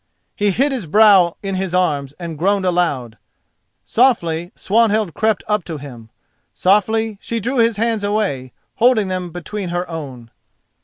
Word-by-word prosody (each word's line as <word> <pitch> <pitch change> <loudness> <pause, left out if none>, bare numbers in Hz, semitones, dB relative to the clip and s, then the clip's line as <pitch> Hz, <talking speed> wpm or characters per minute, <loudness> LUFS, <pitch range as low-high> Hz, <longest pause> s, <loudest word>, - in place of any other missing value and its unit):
He 205 0 +1
hid 270 +9 +1
his 245 -10 -3
brow 195 -2 +5
in 195 -1 -3
his 185 -1 -2
arms 145 -7 0
and 170 -2 -6
groaned 195 +5 +1
aloud. 145 -11 -1 0.6
Softly 175 -9 +1
Swanhild 215 -3 +1
crept 220 -2 0
up 210 -3 0
to 160 -3 -5
him—softly 195 - -2
she 230 - -3
drew 245 +5 -2
his 230 -2 +3
hands 225 -1 0
away, 200 - -1 0.3
holding 230 -4 +3
them 185 -1 -3
between 180 +3 -6
her 175 +1 -2
own. 135 -8 -8
190 Hz, 145 wpm, -19 LUFS, 165-220 Hz, 0.6 s, brow